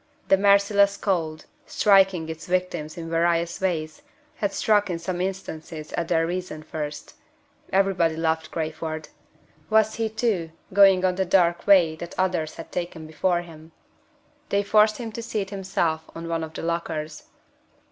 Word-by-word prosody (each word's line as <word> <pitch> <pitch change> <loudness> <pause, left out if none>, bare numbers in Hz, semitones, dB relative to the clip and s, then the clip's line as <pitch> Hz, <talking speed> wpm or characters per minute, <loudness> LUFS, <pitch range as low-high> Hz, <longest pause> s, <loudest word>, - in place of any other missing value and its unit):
The - - +7
merciless 200 0 +4
cold, 160 -5 -2 0.2
striking 195 -5 +4
its 160 0 -7
victims 180 -4 -2
in 165 -1 -6
various 170 +1 0
ways, 160 - -2 0.4
had 205 -2 -1
struck 205 -2 +2
in 175 - -1
some 175 +1 -4
instances 160 -4 -5
at 170 - -2
their 165 -1 +2
reason 175 -3 -4
first. 150 -1 -6 0.6
Everybody 190 -4 +2
loved 160 0 -1
Crayford. 160 -1 -4 0.6
Was 220 0 +3
he, 225 -1 0
too, 215 -7 -1 0.2
going 195 -2 +6
on 185 - +2
the 190 +1 0
dark 175 -2 +2
way 175 -6 +6
that 170 +1 -8
others 180 -4 0
had 165 - -10
taken 175 -2 -4
before 175 +3 0
him? 160 -1 -14 0.8
They 200 0 +1
forced 215 +1 +4
him 230 -2 -6
to 235 - -6
seat 210 -4 -3
himself 180 -5 -2
on 165 0 -6
one 165 -1 -2
of 160 0 -8
the - - -5
lockers. 160 -2 -3
175 Hz, 155 wpm, -24 LUFS, 160-195 Hz, 0.8 s, The